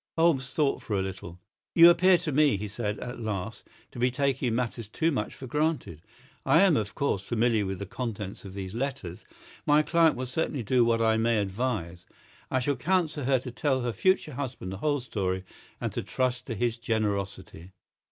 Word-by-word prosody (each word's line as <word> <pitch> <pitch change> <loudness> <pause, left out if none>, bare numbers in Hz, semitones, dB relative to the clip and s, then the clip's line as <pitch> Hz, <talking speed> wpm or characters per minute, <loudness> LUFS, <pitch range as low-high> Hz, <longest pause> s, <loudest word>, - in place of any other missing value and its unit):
Holmes 155 -6 +2
thought 145 -3 +1
for 105 - -2
a - - +1
little. 95 -2 -7 0.4
"You 170 0 +10
appear 185 +1 +5
to 165 -2 -3
me," 145 -4 +4
he 105 +2 -4
said, 105 0 -3
at 125 -1 -6
last, 110 -1 -4 0.2
"to - - -9
be 125 +1 +3
taking 130 -2 0
matters 115 -2 -2
too 160 +10 0
much 110 -7 -3
for 135 - -9
granted. 150 - -1 0.4
I 165 - +5
am, 190 -5 +5
of 105 -2 -2
course, 140 -9 0
familiar 115 -1 +1
with 95 0 -3
the 100 - -5
contents 105 -2 -5
of 95 -1 -9
these 95 -1 -5
letters. 120 -8 -4 0.4
My 150 +1 +4
client 165 0 +3
will 130 - -3
certainly 130 0 -2
do 125 +3 +3
what 115 -1 +2
I 110 0 +3
may 115 0 +2
advise. 100 -4 -2 0.4
I 130 - +1
shall 140 +1 0
counsel 160 -1 0
her 135 0 +3
to 125 - -7
tell 130 +1 0
her 120 -1 -2
future 185 - +1
husband 125 -8 -5
the 95 - -5
whole 145 +4 0
story 95 -6 -2 0.4
and - - -2
to - - -3
trust 125 -1 -2
to 115 - -3
his 115 +2 -1
generosity." 100 -6 -3
120 Hz, 195 wpm, -28 LUFS, 105-140 Hz, 0.4 s, You